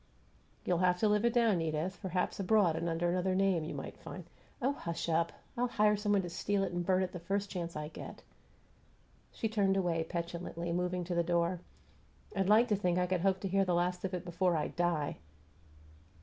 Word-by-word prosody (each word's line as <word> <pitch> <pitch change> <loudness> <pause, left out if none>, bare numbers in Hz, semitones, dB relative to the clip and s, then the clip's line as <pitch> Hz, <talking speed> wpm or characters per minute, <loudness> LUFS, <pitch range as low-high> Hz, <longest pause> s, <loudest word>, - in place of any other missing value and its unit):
"You'll 175 -2 +1
have 180 -1 +3
to 220 - +4
live 210 +2 +2
it 235 - +3
down, 225 -7 +3
Edith. 160 +4 -2
Perhaps 180 +1 -1
abroad 195 -4 +3
and 170 +1 -1
under 165 +1 0
another 185 +1 +1
name 190 -4 +2
you 155 - -5
might - - -7
find - - -8 0.2
" - - -31
"Oh, 260 +3 +2
hush 170 -10 -4
up! 165 0 +1 0.2
I'll 245 +1 +1
hire 210 -3 +3
some 205 0 0
one 195 -2 +3
to 175 - -4
steal 200 +3 0
it - - -2
and 175 0 -2
burn 185 +1 +2
it 180 - -3
the 180 - -6
first 200 +3 -2
chance 170 -2 -4
I 150 0 -3
get." 155 - -9 1.1
She 225 - -2
turned 200 -3 +2
away 170 -3 +1
petulantly, 170 0 -4
moving 180 +1 -1
to 175 +1 -3
the 170 - +3
door. 170 +1 +1 0.8
"I'd 195 0 +1
like 220 +3 +6
to 210 - +4
think 180 -3 0
I 180 - +2
could 180 -1 0
hope 190 0 +2
to 195 - -2
hear 195 +1 +2
the 180 -2 +1
last 180 +1 0
of 190 -1 -2
it 180 - -5
before 175 0 +1
I 150 - -1
die!" 170 -4 -1
180 Hz, 220 wpm, -33 LUFS, 170-195 Hz, 1.1 s, like